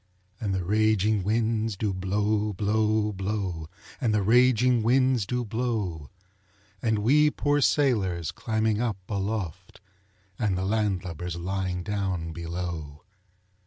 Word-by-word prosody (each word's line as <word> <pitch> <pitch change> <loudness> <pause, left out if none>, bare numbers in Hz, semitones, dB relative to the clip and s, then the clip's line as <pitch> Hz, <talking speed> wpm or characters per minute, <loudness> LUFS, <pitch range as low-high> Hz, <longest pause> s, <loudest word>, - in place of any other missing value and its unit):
Chorus. - - -5
And 100 -2 0
the 95 - -1
raging 110 0 +2
winds 110 0 0
do 100 -1 -1
blow, 105 +3 0
blow, 105 +2 +1
blow, 95 -5 -3 0.3
And 110 -4 +2
the 105 - +2
raging 125 +2 +4
winds 125 -2 +2
do 125 -1 -1
blow; 105 - -2 0.7
And 110 -2 +1
we 145 +8 +4
poor 145 0 +1
sailors 100 - +2
climbing 110 -1 0
up 115 -5 -1
aloft, 95 -3 -4 0.6
And 100 -5 +1
the 95 - -1
land 105 -3 0
lubbers 90 -1 -5
lying 90 0 -2
down 95 -4 -2
below. 85 -3 -5
105 Hz, 125 wpm, -27 LUFS, 95-110 Hz, 0.7 s, raging